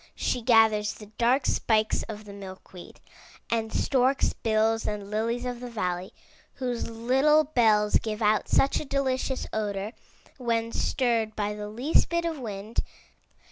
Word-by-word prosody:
She 250 - -1
gathers 220 -2 +4
the 210 -1 -13
dark 250 +3 +3
spikes 220 -1 +1
of 215 -1 -7
the 200 - -10
milk 190 -2 -11
weed 180 -2 -12 0.5
and 225 -1 0
stork's 265 0 +2
bills 225 0 +1
and 205 -1 -4
lilies 230 +3 -1
of 245 -1 -4
the 245 0 -7
valley, 185 -5 -3 0.4
whose 250 -3 -3
little 265 +7 +3
bells 220 -7 +3
give 215 -1 -4
out 210 0 +2
such 275 - +3
a - - -6
delicious 265 -1 -1
odor 205 -1 -2 0.5
when 230 -2 0
stirred 230 -5 0
by 210 -1 -1
the 210 0 -6
least 245 +9 +2
bit 340 0 0
of 325 -3 -2
wind. 215 -1 -5
225 Hz, 150 wpm, -27 LUFS, 210-250 Hz, 0.5 s, gathers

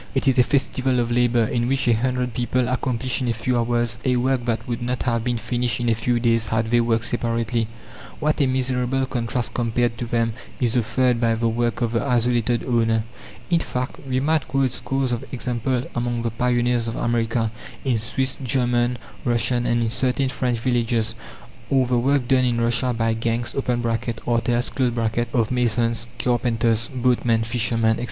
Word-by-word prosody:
It 135 - +1
is 130 -1 +4
a - - +8
festival 130 -1 +1
of 120 0 0
labour, 120 -1 +3
in 120 +2 -1
which 135 0 0
a 120 - +5
hundred 125 +1 -1
people 125 +1 0
accomplish 125 +1 -1
in 125 - -1
a 115 - 0
few 125 +3 -1
hours 120 -1 0
a 130 -1 +2
work 125 0 +1
that 115 -2 -2
would 120 0 -3
not 125 +1 -2
have 115 -2 0
been 120 -1 0
finished 120 +2 -1
in 120 -1 0
a - - +4
few 120 +2 0
days 115 -1 +2
had 110 0 0
they 120 0 +4
worked 115 -1 +1
separately. 115 -1 -1 0.5
What 150 0 +1
a 140 - +3
miserable 130 0 0
contrast 120 -1 -2
compared 120 0 0
to 120 - -3
them 115 -1 0 0.3
is 120 -2 +1
offered 120 +1 +2
by 115 -1 +3
the 115 +1 0
work 120 0 -1
of 120 -2 +1
the 115 - 0
isolated 120 -2 +1
owner! 115 -3 +2 0.5
In 170 - +4
fact, 125 -4 -3
we 130 0 +1
might 150 +1 +1
quote 135 -1 +1
scores 135 +1 -1
of 120 - -2
examples 125 0 -2
among 120 -1 -1
the 115 - -1
pioneers 120 0 +1
of 115 - -3
America, 115 -1 0 0.3
in 125 -4 +1
Swiss, 130 +4 -1
German, 120 -1 +1 0.3
Russian, 120 +1 +1
and 120 0 +2
in 115 - 0
certain 130 +2 +1
French 125 -1 -1
villages; 115 -2 0 0.6
or 135 -2 +3
the 125 -1 +1
work 135 0 +1
done 130 0 +4
in 120 -1 +1
Russia 120 +2 +1
by 115 -1 0
gangs 115 +1 -2
(artels) 120 -1 0
of 115 -3 +1
masons, 115 -2 +1
carpenters, 115 -2 +1
boatmen, 120 -3 +1
fishermen, 115 0 +1
etc. 110 - -1
120 Hz, 180 wpm, -22 LUFS, 115-125 Hz, 0.6 s, a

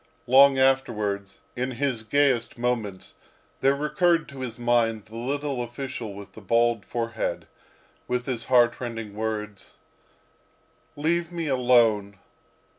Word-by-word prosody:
Long 135 +2 +6
afterwards, 105 -7 0
in 125 +1 -2
his 125 -3 -1
gayest 130 0 +1
moments, 115 -6 -3 0.4
there 135 +1 +3
recurred 165 +3 +1
to 140 -1 -10
his 125 -3 -5
mind 115 -3 +1
the 110 - -14
little 135 +2 -2
official 120 -3 -6
with 100 0 -11
the 110 - -12
bald 115 +1 +2
forehead, 115 -2 -3 0.6
with 125 0 -1
his 120 -4 -3
heart 120 -2 +4
rending 115 -4 -5
words, 105 -2 -5 1.2
"Leave 170 +3 0
me 170 -1 -3
alone! 120 -6 +3
120 Hz, 120 wpm, -25 LUFS, 110-135 Hz, 1.2 s, Long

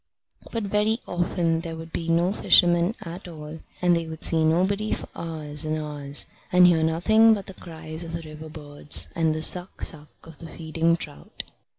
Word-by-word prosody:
But 230 -2 -3
very 210 +3 +1
often 175 -2 0
there 165 -1 -6
would 160 0 -10
be 165 0 -3
no 170 +3 +2
fishermen 175 0 +4
at 180 0 -8
all, 155 -1 -9 0.2
and 175 -1 +4
they 165 -1 -2
would 160 0 -8
see 160 -1 +3
nobody 190 +6 +1
for - - -5
hours 155 -2 -3
and 155 0 -2
hours, 145 -2 0 0.3
and 180 0 +6
hear 170 -2 +4
nothing 220 +8 +4
but 200 -2 -7
the 195 - -9
cries 160 -2 -5
of 165 0 -8
the 165 0 -5
river 155 0 -10
birds 145 -1 -1
and 160 -2 +1
the 155 - -1
suck, 180 +3 -1
suck, 150 -2 0 0.2
of 165 -3 -13
the 165 - -9
feeding 165 +1 0
trout. 75 - -8
165 Hz, 190 wpm, -24 LUFS, 155-180 Hz, 0.3 s, and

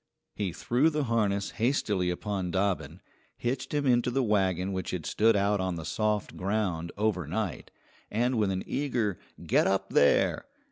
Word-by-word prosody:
He 100 -4 -2
threw 125 - +2
the 150 -2 -1
harness 105 -5 0
hastily 110 -6 0
upon 95 0 -2
Dobbin, 95 +1 -1 0.4
hitched 125 +2 -3
him 145 -1 0
into 125 -1 +3
the 135 +2 +1
wagon 95 -3 +1
which 95 0 -3
had 90 -4 -4
stood 110 +1 +3
out 100 +1 +2
on 95 -1 -1
the 80 -1 -6
soft 105 +5 -1
ground 95 -4 -1
overnight, 100 -2 -2 0.4
and 120 +2 +1
with 105 -2 +2
an 95 -1 -2
eager 120 - -1 0.3
"Get - - +3
up, 95 0 0
there!" 70 - +3
105 Hz, 155 wpm, -29 LUFS, 95-115 Hz, 0.4 s, into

